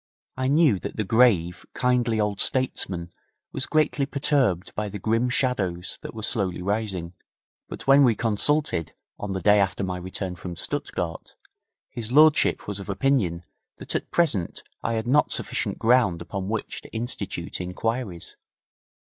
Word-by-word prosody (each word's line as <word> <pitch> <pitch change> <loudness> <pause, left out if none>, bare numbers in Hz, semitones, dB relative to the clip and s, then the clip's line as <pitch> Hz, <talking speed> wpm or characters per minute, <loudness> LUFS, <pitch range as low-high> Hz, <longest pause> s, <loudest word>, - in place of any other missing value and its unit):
I 130 0 -1
knew 140 - +4
that - - -6
the 110 - -1
grave, 95 -6 +3
kindly 125 -3 +1
old 105 -1 0
statesman 95 -9 0 0.4
was 130 - -2
greatly 150 -3 +1
perturbed 135 - +1
by 105 0 -3
the 105 - -6
grim 115 +5 +1
shadows 100 -9 -1
that - - -8
were 110 - -6
slowly 100 -6 0
rising, 95 -3 -2 0.6
but - - -8
when 140 +1 +7
we 120 -4 +4
consulted 115 - +1 0.3
on 105 -2 -4
the 95 - -3
day 105 0 +5
after 100 0 0
my 90 -1 -2
return 95 +1 -4
from 90 0 -7
Stuttgart, 80 0 -4 0.5
his 115 -1 -7
lordship 155 +2 +4
was 100 -1 -4
of 100 - -8
opinion 100 -7 +1 0.3
that - - -3
at - - -2
present 140 - +1 0.2
I 115 - -1
had 110 0 -2
not 140 +5 +3
sufficient - - -2
ground 115 -7 +3
upon 95 +1 -5
which 110 0 -3
to - - -13
institute 105 -7 -4
inquiries. 95 +1 -3
105 Hz, 155 wpm, -25 LUFS, 95-125 Hz, 0.6 s, when